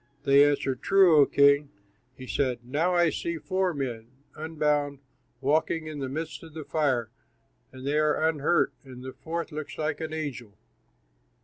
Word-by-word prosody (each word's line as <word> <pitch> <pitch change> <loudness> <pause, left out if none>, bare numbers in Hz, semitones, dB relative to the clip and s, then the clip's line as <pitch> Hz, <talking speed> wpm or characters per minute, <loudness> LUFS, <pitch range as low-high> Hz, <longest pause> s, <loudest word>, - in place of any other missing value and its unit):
They 140 +1 +6
answered, 135 -3 -1
"True, 190 -5 +5
O 145 - +6
king." 140 0 +4 0.5
He 130 - -9
said, 125 -2 -1
"Now 160 +8 0
I 175 -2 +4
see 170 0 -3
four 185 +2 0
men, 125 -7 -4 0.3
unbound, 150 -2 -1 0.4
walking 155 +3 +1
in 155 -2 -6
the 135 -2 -3
midst 155 +2 -5
of 160 -2 -13
the 160 - -5
fire, 130 -7 0 0.6
and 130 0 -10
they 145 +2 +1
are 155 +1 +2
unhurt, 160 +2 +1
and 130 -2 -11
the 130 0 -7
fourth 170 +1 -5
looks 155 -1 -6
like 155 +1 -2
an 160 -1 -4
angel." 135 -9 -6
150 Hz, 165 wpm, -27 LUFS, 135-160 Hz, 0.6 s, They